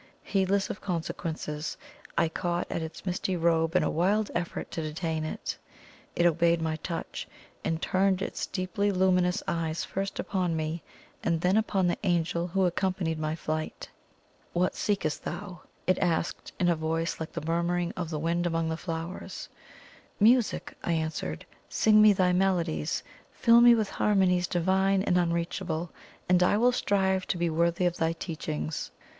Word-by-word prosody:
Heedless 195 Hz, 0 st, +1 dB
of 205 Hz, -, -8 dB
consequences, 160 Hz, -3 st, -3 dB, 0.4 s
I 165 Hz, -, +4 dB
caught 175 Hz, +2 st, -2 dB
at -, -, -1 dB
its 160 Hz, +3 st, -7 dB
misty 185 Hz, 0 st, -1 dB
robe 165 Hz, 0 st, +2 dB
in 180 Hz, -, +4 dB
a -, -, +1 dB
wild 200 Hz, +6 st, +1 dB
effort 170 Hz, 0 st, -3 dB
to 165 Hz, -, -3 dB
detain 160 Hz, 0 st, -2 dB
it. 155 Hz, -, -4 dB, 0.6 s
It 175 Hz, -, +2 dB
obeyed 170 Hz, 0 st, +3 dB
my 160 Hz, -1 st, -1 dB
touch, 165 Hz, +1 st, -5 dB, 0.4 s
and 160 Hz, -, -1 dB
turned 190 Hz, +2 st, +2 dB
its -, -, -3 dB
deeply 200 Hz, +2 st, -1 dB
luminous 180 Hz, -1 st, +2 dB
eyes 165 Hz, -1 st, -1 dB
first 195 Hz, +1 st, -3 dB
upon 180 Hz, -4 st, -1 dB
me, 160 Hz, +1 st, -2 dB, 0.4 s
and 165 Hz, -, +1 dB
then 180 Hz, +3 st, +3 dB
upon 210 Hz, -4 st, +2 dB
the 175 Hz, -, 0 dB
Angel 170 Hz, -2 st, 0 dB
who 190 Hz, +2 st, +1 dB
accompanied 175 Hz, -2 st, 0 dB
my 155 Hz, 0 st, -1 dB
flight. 155 Hz, -1 st, -4 dB, 0.6 s
"What 180 Hz, +1 st, +1 dB
seekest 195 Hz, -7 st, -1 dB
thou?" 190 Hz, -5 st, -6 dB, 0.2 s
it 185 Hz, 0 st, +2 dB
asked 170 Hz, -2 st, -1 dB
in 180 Hz, -, +3 dB
a 170 Hz, -, +4 dB
voice 160 Hz, +1 st, -2 dB
like 160 Hz, -, -5 dB
the -, -, -5 dB
murmuring 170 Hz, +1 st, 0 dB
of 175 Hz, -3 st, -3 dB
the 155 Hz, -, -3 dB
wind 170 Hz, +3 st, 0 dB
among 165 Hz, -1 st, 0 dB
flowers. 165 Hz, +1 st, -5 dB, 0.7 s
"Music!" 230 Hz, +2 st, +3 dB
I 170 Hz, -, 0 dB
answered. 155 Hz, -, -3 dB, 0.2 s
"Sing 215 Hz, -1 st, +5 dB
me 215 Hz, 0 st, +8 dB
thy 185 Hz, -2 st, +3 dB
melodies 180 Hz, -, +1 dB, 0.3 s
fill 235 Hz, 0 st, +5 dB
me 240 Hz, 0 st, +8 dB
with 215 Hz, -3 st, 0 dB
harmonies 185 Hz, -4 st, +2 dB
divine 190 Hz, +2 st, +2 dB
and 180 Hz, -3 st, +3 dB
unreachable 170 Hz, 0 st, -1 dB, 0.4 s
and 180 Hz, 0 st, +4 dB
I 180 Hz, +3 st, +4 dB
will 245 Hz, +3 st, +4 dB
strive 190 Hz, -5 st, +1 dB
to 180 Hz, -, -1 dB
be 170 Hz, -1 st, 0 dB
worthy 170 Hz, +2 st, +1 dB
of 175 Hz, 0 st, +1 dB
thy 165 Hz, 0 st, +1 dB
teachings!" 80 Hz, -, -4 dB
175 Hz, 160 wpm, -28 LUFS, 165-190 Hz, 0.7 s, me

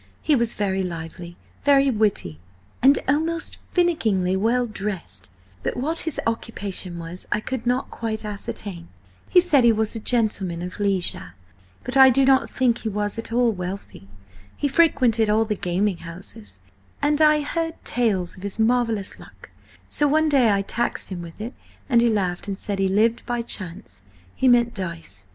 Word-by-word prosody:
He 305 Hz, -, +3 dB
was 235 Hz, -3 st, 0 dB
very 195 Hz, -2 st, 0 dB
lively, 170 Hz, 0 st, -6 dB, 0.3 s
very 275 Hz, -1 st, +4 dB
witty, 205 Hz, -, 0 dB, 0.4 s
and 275 Hz, +3 st, +6 dB
almost 320 Hz, +4 st, 0 dB
finickingly 220 Hz, -, +1 dB
well 235 Hz, +5 st, +1 dB
dressed, 190 Hz, -, -6 dB, 0.3 s
but -, -, -3 dB
what 310 Hz, +6 st, -1 dB
his 305 Hz, -, -4 dB
occupation 205 Hz, -6 st, -3 dB
was 170 Hz, +2 st, -7 dB
I 210 Hz, -, +2 dB
could 245 Hz, +1 st, -5 dB
not 250 Hz, +2 st, 0 dB
quite 220 Hz, -1 st, -2 dB
ascertain. 200 Hz, -4 st, -4 dB, 0.4 s
He 365 Hz, -, +6 dB
said 315 Hz, -7 st, +4 dB
he 235 Hz, -, +6 dB
was 220 Hz, -1 st, 0 dB
a -, -, -3 dB
gentleman 205 Hz, -7 st, +1 dB
of 180 Hz, +2 st, -7 dB
leisure, 190 Hz, -, -2 dB, 0.5 s
but -, -, -3 dB
I 265 Hz, -1 st, +9 dB
do 265 Hz, +2 st, +3 dB
not 265 Hz, 0 st, +4 dB
think 245 Hz, -3 st, +1 dB
he 220 Hz, -, -3 dB
was 205 Hz, +2 st, -2 dB
at 225 Hz, -, -5 dB
all 240 Hz, 0 st, +3 dB
wealthy. 185 Hz, -, -7 dB, 0.5 s
He 290 Hz, -, 0 dB
frequented 255 Hz, -8 st, +3 dB
all 220 Hz, +1 st, +3 dB
the 215 Hz, -, -1 dB
gaming 190 Hz, 0 st, -1 dB
houses, 180 Hz, +6 st, -11 dB, 0.4 s
and 295 Hz, +1 st, +2 dB
I 305 Hz, -1 st, +5 dB
heard 325 Hz, +2 st, -2 dB
tales 205 Hz, -8 st, 0 dB
of -, -, -12 dB
his 200 Hz, 0 st, -4 dB
marvellous 225 Hz, -3 st, 0 dB
luck, -, -, -15 dB, 0.4 s
so 295 Hz, -, +1 dB
one 310 Hz, +2 st, +3 dB
day 260 Hz, -6 st, +4 dB
I 200 Hz, 0 st, +1 dB
taxed 235 Hz, +4 st, -2 dB
him 185 Hz, -3 st, -5 dB
with 170 Hz, +1 st, -11 dB
it, 230 Hz, +5 st, -5 dB, 0.3 s
and 235 Hz, -3 st, +4 dB
he 235 Hz, -, +3 dB
laughed 190 Hz, -5 st, -1 dB
and 195 Hz, -1 st, -3 dB
said 200 Hz, -1 st, -4 dB
he 195 Hz, -, +2 dB
lived 225 Hz, +4 st, +2 dB
by 240 Hz, -1 st, -1 dB
Chance–he 100 Hz, -, -5 dB
meant 240 Hz, -1 st, +4 dB
dice. 100 Hz, -, -4 dB
220 Hz, 170 wpm, -23 LUFS, 185-250 Hz, 0.5 s, I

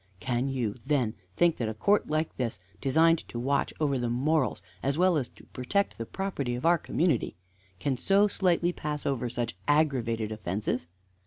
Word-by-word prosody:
Can 125 Hz, +6 st, -1 dB
you, 125 Hz, -6 st, -1 dB
then, 130 Hz, -6 st, +1 dB, 0.2 s
think 175 Hz, -2 st, +3 dB
that 115 Hz, -3 st, -1 dB
a 110 Hz, -, -5 dB
court 205 Hz, -, +2 dB
like 155 Hz, +1 st, -1 dB
this, 120 Hz, -3 st, -2 dB, 0.2 s
designed 160 Hz, +4 st, +4 dB
to -, -, -7 dB
watch 135 Hz, +4 st, 0 dB
over 140 Hz, -4 st, +1 dB
the 120 Hz, -1 st, -1 dB
morals, 135 Hz, -, +1 dB, 0.2 s
as 140 Hz, +2 st, 0 dB
well 180 Hz, 0 st, +4 dB
as 135 Hz, -6 st, -1 dB
protect 195 Hz, -, -2 dB
the 115 Hz, -, -4 dB
property 145 Hz, -11 st, -2 dB
of 125 Hz, -, -5 dB
our 170 Hz, 0 st, +5 dB
community, 160 Hz, -8 st, 0 dB, 0.4 s
can 135 Hz, +7 st, 0 dB
so 195 Hz, +10 st, +4 dB
slightly 180 Hz, -3 st, +1 dB
pass 150 Hz, -2 st, -4 dB
over 125 Hz, -3 st, 0 dB
such 120 Hz, -5 st, -3 dB
aggravated 120 Hz, -8 st, +1 dB
offences? 105 Hz, -1 st, -2 dB
135 Hz, 170 wpm, -28 LUFS, 120-160 Hz, 0.4 s, our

